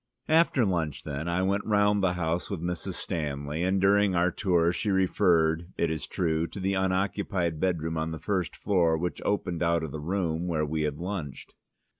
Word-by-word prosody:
After 155 -6 +4
lunch, 85 -6 -1
then, 75 +2 -4
I 85 +2 0
went 100 +2 +1
round 105 -1 +2
the 90 -2 +2
house 85 -1 -2
with 100 - -3
Mrs. 85 0 -3
Stanley, 75 -1 -3
and 95 +2 +1
during 100 0 +3
our 90 +1 +3
tour 85 -3 +2
she 105 - -2
referred, 85 -3 +2
it 85 -1 +1
is 80 - -4
true, 80 -1 0
to 100 - -8
the 95 +1 0
unoccupied 95 -3 0
bedroom 80 -3 -1
on 80 0 -2
the 80 - -5
first 90 -2 -2
floor, 85 -5 +2
which 90 +2 -3
opened 90 -5 -1
out 85 -1 +2
of 80 - -4
the 80 - -5
room 85 0 -1
where 80 -3 0
we 80 +1 -2
had 70 - -9
lunched. 85 -6 -6
85 Hz, 190 wpm, -28 LUFS, 80-95 Hz, -, After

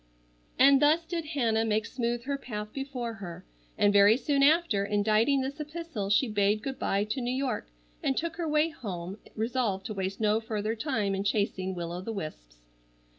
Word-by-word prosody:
And 275 +1 +6
thus 310 +3 +4
did 335 -1 -3
Hannah 235 -8 +1
make 215 -1 +1
smooth 235 -1 -2
her 280 +2 -2
path 210 -6 -6
before 265 -4 -4
her, 190 -6 -8 0.3
and 205 0 +4
very 205 +3 +7
soon 280 0 +1
after 290 - +4
inditing 215 +6 +2
this 275 +3 -4
epistle 300 -9 -5
she 205 +6 +3
bade 210 0 +1
good 270 -1 -4
bye 200 +1 +1
to 215 +5 -3
New 240 - -2
York 260 -4 -2 0.3
and 270 - 0
took 330 0 -2
her 340 -2 -2
way 305 +1 +2
home 190 - -6 0.2
resolved 220 -4 -1
to 215 - -4
waste 195 -1 -3
no 215 0 +2
further 220 0 -2
time 220 -6 -1
in 195 0 -1
chasing 200 -2 -1
will 170 -1 -4
o 175 +1 -4
the 225 +4 -5
wisps. - - -8
225 Hz, 185 wpm, -29 LUFS, 200-275 Hz, 0.3 s, very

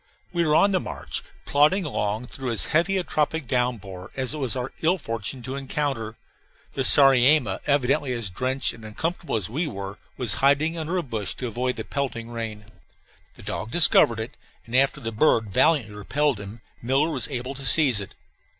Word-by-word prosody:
We 170 -1 +1
were 155 -2 +2
on 200 +5 +5
the 185 - +2
march, - - -5 0.2
plodding 155 +7 +3
along 110 -4 -2
through 130 0 -5
as 115 - +1
heavy 175 +5 +2
a 185 - 0
tropic 155 -2 -1
downpour 110 -8 -2
as 130 +1 0
it 155 - -5
was 130 -4 +1
our 125 0 -4
ill 170 +4 +2
fortune 115 - -5
to 130 +2 -5
encounter. 135 -5 -3 0.6
The 135 - -1
sariema, 135 -5 +6
evidently 140 0 +1
as 115 -6 -3
drenched 130 +7 -1
and 115 -1 -14
uncomfortable 160 +9 -3
as 105 -5 -2
we 155 +9 -2
were, 100 -4 -7 0.2
was 120 -4 +1
hiding 145 +4 +3
under 165 +2 -3
a 175 - -1
bush 110 - -4
to 130 - -5
avoid 125 +2 -2
the - - -5
pelting 120 -4 -4
rain. 110 -2 -6 0.7
The - - -14
dog 110 - -4
discovered 120 -7 +5
it, 110 +5 -6 0.3
and 115 - -6
after 135 +1 +3
the 115 - -4
bird 110 -2 +2
valiantly 135 - +2
repelled 135 +5 -1
him, 105 +3 -10 0.2
Miller 135 +6 +1
was 135 -5 +1
able 130 -1 -4
to 135 0 -9
seize 135 -4 +5
it. 100 - -8
130 Hz, 185 wpm, -24 LUFS, 115-150 Hz, 0.7 s, sariema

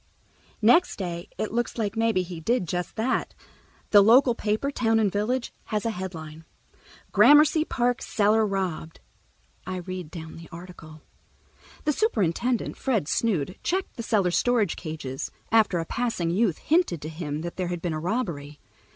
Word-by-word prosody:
Next 245 +11 +5
day 175 -1 -5
it 215 - -2
looks 240 +2 -2
like 215 -2 -2
maybe 225 -4 +2
he 175 -2 -7
did 225 +2 0
just 180 +2 -3
that. 235 +4 -1 0.6
The 205 - +8
local 240 +4 +6
paper, 220 +5 -1
Town 225 -4 +2
and 210 -3 +2
Village, 235 +5 -1
has 210 -1 -2
a 230 - +1
headline: 165 -6 -7 0.7
"Gramercy 295 +8 +6
Park 245 -3 0
Cellar 215 +1 +2
Robbed." 190 -6 -3 0.7
I 185 - -3
read 185 -2 -6
down 160 -1 -9
the 165 0 -12
article: 165 -3 -11 0.8
"The 300 - +1
superintendent, 240 - 0
Fred 225 - 0
Snood, 185 -4 0
checked 375 +2 -2
the 235 - -5
cellar 205 -6 +1
storage 220 0 +2
cages, 155 -5 -5 0.2
after 215 -5 +4
a 165 - -2
passing 225 -6 -1
youth 195 -2 +1
hinted 320 - +1
to - - -4
him 155 -2 -4
that 170 +1 -6
there 185 -1 -1
had 175 0 -3
been 175 -3 -1
a 155 - -2
robbery. 165 - -3
200 Hz, 160 wpm, -26 LUFS, 170-230 Hz, 0.8 s, The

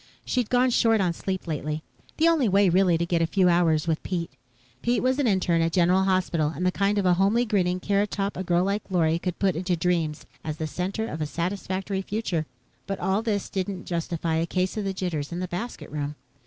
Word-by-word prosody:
She'd 250 -4 0
gone 250 0 +3
short 225 -2 +3
on 180 -3 +1
sleep 190 +2 -4
lately 155 -1 -3 0.3
the 320 - +4
only 310 -9 +3
way, 195 0 +4
really, 180 -1 +4
to 170 - 0
get 170 -1 +1
a 165 - +2
few 180 +2 +3
hours 165 -3 +3
with 160 -1 0
Pete. 170 -3 -3 0.5
Pete 240 -2 +1
was 260 +2 +2
an 280 - +2
interne 180 -5 +2
at 165 0 0
General 185 +1 +3
Hospital, 180 -5 +1
and 180 - -2
the 185 - +3
kind 200 +2 +1
of 200 - +1
a 180 - +5
homely 200 +7 +3
grinning 185 -5 +1
carrot 200 +2 +1
top 200 0 -2
a 185 - -3
girl 175 0 +2
like 200 +2 0
Lorry 165 -3 +2
could 180 -1 -3
put 190 -4 +1
into 180 +2 0
dreams 165 -3 -1 0.2
as 155 -1 -4
the 160 - -2
center 185 +7 -3
of 155 -5 -5
a 155 - -1
satisfactory 190 +3 -2
future. 190 -6 -2 0.4
But 195 - -3
all 195 +3 +1
this 210 -3 -1
didn't 190 -1 -4
justify 170 -1 -2
a 165 +1 0
case 185 +1 -1
of 200 -3 -1
jitters 165 -6 -3
in 170 - -3
the 185 - -2
"basket 200 - -6
room." 145 0 -3
185 Hz, 220 wpm, -26 LUFS, 170-200 Hz, 0.5 s, a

